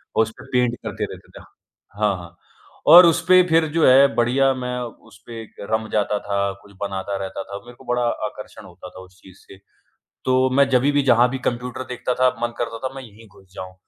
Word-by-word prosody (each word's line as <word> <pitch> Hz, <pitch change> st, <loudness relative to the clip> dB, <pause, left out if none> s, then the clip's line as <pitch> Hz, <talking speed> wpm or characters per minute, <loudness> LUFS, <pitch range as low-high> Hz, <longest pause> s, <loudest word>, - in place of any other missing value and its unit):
और -, -, +1 dB
उस 110 Hz, -, -6 dB
पे -, -, -11 dB
पेंट 125 Hz, -1 st, +1 dB
करते -, -, -5 dB
रहते -, -, -15 dB
थे। -, -, -15 dB, 0.6 s
हाँ, 105 Hz, -2 st, +1 dB
हाँ, 85 Hz, -1 st, -12 dB, 0.5 s
और 175 Hz, +3 st, +10 dB
उस 170 Hz, 0 st, +3 dB
पे 185 Hz, 0 st, +7 dB
फिर 160 Hz, 0 st, +3 dB
जो 165 Hz, -, +3 dB
है 135 Hz, +2 st, +7 dB
बढ़िया 130 Hz, +3 st, +2 dB
मैं 125 Hz, -1 st, -4 dB, 0.3 s
उस -, -, -18 dB
पे 115 Hz, -1 st, -8 dB
एक 110 Hz, -, -15 dB, 0.2 s
रम 110 Hz, 0 st, 0 dB
जाता 105 Hz, 0 st, 0 dB
था, 100 Hz, -1 st, -2 dB
कुछ 100 Hz, -, -19 dB
बनाता 100 Hz, 0 st, -4 dB
रहता 95 Hz, 0 st, -6 dB
था, 100 Hz, -, -8 dB
मेरे 120 Hz, -, -13 dB
को 130 Hz, -, -18 dB
बड़ा 125 Hz, -, 0 dB, 0.2 s
आकर्षण 105 Hz, -1 st, -9 dB
होता 90 Hz, 0 st, -12 dB
था 95 Hz, -, -13 dB
उस 95 Hz, 0 st, -20 dB
चीज़ 95 Hz, 0 st, -17 dB
से। 95 Hz, -, -16 dB, 0.7 s
तो 130 Hz, 0 st, +2 dB
मैं 140 Hz, +1 st, +3 dB
जभी 135 Hz, +2 st, +2 dB
भी 145 Hz, 0 st, +2 dB
जहाँ 120 Hz, -1 st, +4 dB
भी 135 Hz, -, -4 dB
कंप्यूटर 125 Hz, +1 st, -6 dB
देखता 125 Hz, +1 st, -2 dB
था, 130 Hz, 0 st, +3 dB
मन 120 Hz, 0 st, -2 dB
करता 115 Hz, -1 st, -4 dB
था 135 Hz, -, -11 dB
मैं 135 Hz, -, -8 dB
यहीं 110 Hz, -1 st, -16 dB
घुस 95 Hz, -1 st, -21 dB
जाऊँ, 95 Hz, 0 st, -8 dB
120 Hz, 225 wpm, -21 LUFS, 100-130 Hz, 0.7 s, और